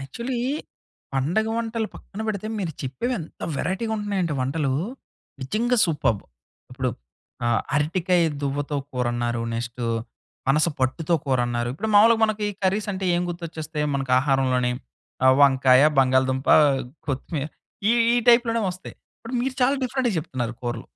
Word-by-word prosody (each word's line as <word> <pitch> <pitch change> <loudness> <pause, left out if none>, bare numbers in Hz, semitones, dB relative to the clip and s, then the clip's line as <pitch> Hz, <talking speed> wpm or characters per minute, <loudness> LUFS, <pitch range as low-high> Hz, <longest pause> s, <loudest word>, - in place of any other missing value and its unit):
Actually 235 - -4 0.8
పండగ 175 +12 +1
వంటలు 230 -1 -2
పక్కన 205 - -10
బెడితే 215 -1 -3
మీరు 175 -5 -2
చెప్పేవి 140 - -2
ఎంత 160 - -10
వేరైటీగా 220 +5 -2
ఉంటున్నాయంటే 195 -7 -1
వంటలు! 135 +1 0 0.7
నిజంగా 235 - 0
సూపర్బ్! 145 - 0 0.5
ఇప్పుడు - - -1 0.6
ఆహ్, 115 -1 +2
అరటికాయ 175 +4 +2 0.2
దువ్వతో 145 +1 -2 0.2
కూరన్నారు 120 -1 -1
నెక్స్ట్ 120 +1 -4 0.6
పనసపట్టుతో 150 +2 +1
కూరన్నారు 120 -3 0
ఇప్పుడు 215 +11 -4
మామూలుగా 225 +2 +6
మనకి 215 -1 -1 0.2
కర్రీస్ 200 +3 +1
అంటే 190 0 -4
ఏం 175 - +1
గుర్తొచ్చేస్తాయి 160 -3 -4
మనకు 135 -2 -1
ఆహారంలోనీ 130 -2 +2 0.5
ఆహ్, 130 0 +7
వంకాయ 130 -1 +6 0.2
బంగాళాదుంప 130 0 +2 0.6
కొత్తిమీర 140 +2 -2 0.4
ఈ, - - +5 0.2
ఈ - - +3
టైప్‌లోనే 235 -1 +5
వస్తాయి 185 +1 -9 0.2
ఇప్పుడు 230 +3 -8
మీరు 260 0 -2
చాలా 275 +3 +3
డిఫరెంట్‌గా 255 -3 0
చెప్తున్నారు 120 -6 -4
కూరలు. 120 -1 -3
155 Hz, 125 wpm, -24 LUFS, 130-210 Hz, 0.8 s, ఆహ్